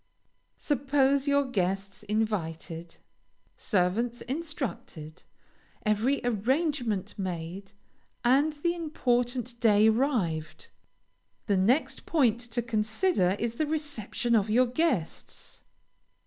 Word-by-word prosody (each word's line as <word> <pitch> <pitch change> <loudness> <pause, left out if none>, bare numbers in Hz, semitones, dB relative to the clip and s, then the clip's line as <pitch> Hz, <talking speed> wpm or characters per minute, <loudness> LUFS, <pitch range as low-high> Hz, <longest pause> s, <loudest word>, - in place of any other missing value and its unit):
Suppose 280 0 +1
your 285 0 +3
guests 195 -3 -2
invited, 175 -6 -3 0.6
servants 220 +5 0
instructed, 255 - -5 0.6
every 220 +6 +1
arrangement 240 - 0
made, 185 +2 -5 0.5
and 275 +5 +4
the 340 +4 -1
important 245 -7 -1
day 215 -1 +5
arrived. 215 - -1 0.8
The 200 -3 +2
next 235 +11 +1
point 245 -8 +3
to 240 0 -4
consider 220 - +1
is 230 +1 -2
the 305 +6 -1
reception 290 -6 -1
of 210 -1 +2
your 245 +4 +4
guests. 250 - -2
235 Hz, 90 wpm, -28 LUFS, 195-275 Hz, 0.8 s, day